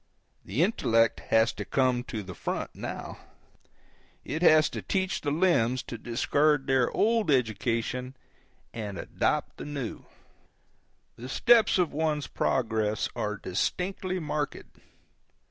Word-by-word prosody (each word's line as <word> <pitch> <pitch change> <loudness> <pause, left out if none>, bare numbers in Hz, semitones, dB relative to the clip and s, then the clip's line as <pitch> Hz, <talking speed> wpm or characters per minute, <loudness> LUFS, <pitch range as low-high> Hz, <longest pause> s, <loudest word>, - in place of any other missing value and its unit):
The 120 - 0
intellect 115 - +2
has 115 +1 +4
to 105 - -5
come 125 +2 +1
to 110 -4 -5
the 95 -1 -8
front, - - -4
now. - - -6 1.1
It 155 +5 -3
has 155 -3 +6
to - - -5
teach 190 -1 -1
the 145 - -1
limbs 145 -7 +2
to 115 - -7
discard 145 +5 +1
their 130 -2 +2
old 225 -3 +1
education 125 +1 0 0.6
and 105 -4 -5
adopt - - -1
the - - -7
new. 140 -6 -5 1.1
The 125 +2 -8
steps 235 - +4
of 180 -3 +1
one's 150 -1 0
progress 110 -4 0
are 105 -3 -2
distinctly 185 - -2
marked. 150 -2 -4
130 Hz, 125 wpm, -28 LUFS, 115-155 Hz, 1.1 s, has